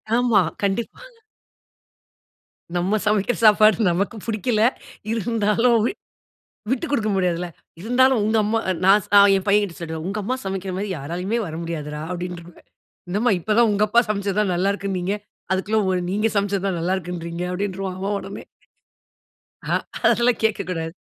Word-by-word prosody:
ஆமா. 240 -4 +4 0.2
கண்டிப்பா. 200 - -2 1.8
நம்ம 190 +5 +1
சமைக்கிற 210 +3 +1
சாப்பாடு 215 0 +5
நமக்கு 200 +6 -1
புடிக்கல. 220 0 0 0.5
இருந்தாலும் 230 +1 +2
விட் 395 - -3 0.7
விட்டுக் 275 +4 -1
குடுக்க 220 -6 +1
முடியாதுல்ல. 180 -2 0 0.3
இருந்தாலும் 250 +3 +3
உங்க 220 +1 +1
அம்மா, 225 +2 +1 0.2
நான் 200 +2 +6
ச - - -19 0.3
என் 190 - 0
பையங்கிட்ட 200 -3 +2
சொல்லிடுவேன். 160 -1 -5
உங்கம்மா 210 +5 -2
சமைக்கிற 190 -1 -4
மாதிரி 200 +2 -3
யாராலுமே 180 +10 -3
வர 160 - -6
முடியாதுடா 150 -3 -5
அப்படின்றுவே. 175 -1 -7 0.5
என்னம்மா 210 +7 +1
இப்ப 215 +4 -1
தான் 235 -1 +5
உங்கப்பா 210 +3 +2
சமச்சது 200 -1 -1
தான் 195 -3 +1
நல்லா 190 +3 +1
இருக்குனீங்க. 195 -1 -2 0.4
அதுக்குள்ள 190 -1 +1
நீங்க 210 +3 +1
சமச்சது 200 -1 0
தான் 180 - -2
நல்லா 180 +3 0
இருக்குன்றீங்க 170 -1 -5
அப்படின்றுவா 190 0 -3
அவன் 200 +2 -2
உடனே. 195 +1 -8 1.3
அ, - - +1 0.4
அதெல்லாம் 240 0 +2
கேட்கக்கூடாது. 180 -6 -1
200 Hz, 135 wpm, -22 LUFS, 180-215 Hz, 1.8 s, நான்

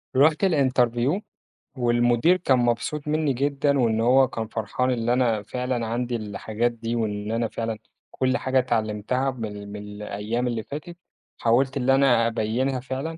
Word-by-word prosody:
رُحت 150 +6 +4
الinterview، 130 - +2 0.6
والمدير 120 +7 +3
كان 135 -8 +2
مبسوط 120 +5 -1
مني 150 -2 +1
جدًا، 140 +2 +1
وإن 115 -2 +2
هو 130 +3 +5
كان 115 -2 -4
فرحان 115 +4 -1
إن 120 -1 -1
أنا 120 -4 +2
فعلًا 125 +2 -2
عندي 120 +2 -2
الحاجات 110 +2 -2
دي، 115 0 -4
وإن 105 -2 -2
أنا 115 0 0
فعلًا 115 0 -4 0.3
كل 130 0 0
حاجة 130 0 +1
اتعلُمتها 115 +2 -1
من 105 -4 -7
من 105 - -6
الأيام 105 +3 -4
اللي 115 -2 -2
فاتت، 160 +7 -8 0.4
حاولت 130 +4 +2
إن 130 -1 -1
أنا 135 -4 +4
أبيّنها 120 +4 -1
فعلًا، 135 +5 -5
120 Hz, 150 wpm, -24 LUFS, 115-135 Hz, 0.6 s, هو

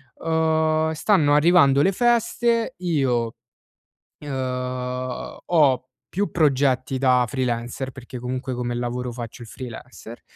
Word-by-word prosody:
Uhm, 160 -1 +1
stanno 155 -4 +3
arrivando 150 -3 +5
le 195 - +3
feste, 235 +1 +1
io, 130 -10 0 0.9
uhm, 125 -2 -4
ho 140 -6 +3 0.2
più 200 +3 -2
progetti 135 -4 +1
da 125 -2 +4
freelancer, 125 +1 -3
perché 125 -1 -9
comunque 130 +1 -4
come 120 0 -3
lavoro 125 +1 -3
faccio 120 0 -8
il 115 - -10
freelancer 120 -1 -10
130 Hz, 110 wpm, -23 LUFS, 125-160 Hz, 0.9 s, arrivando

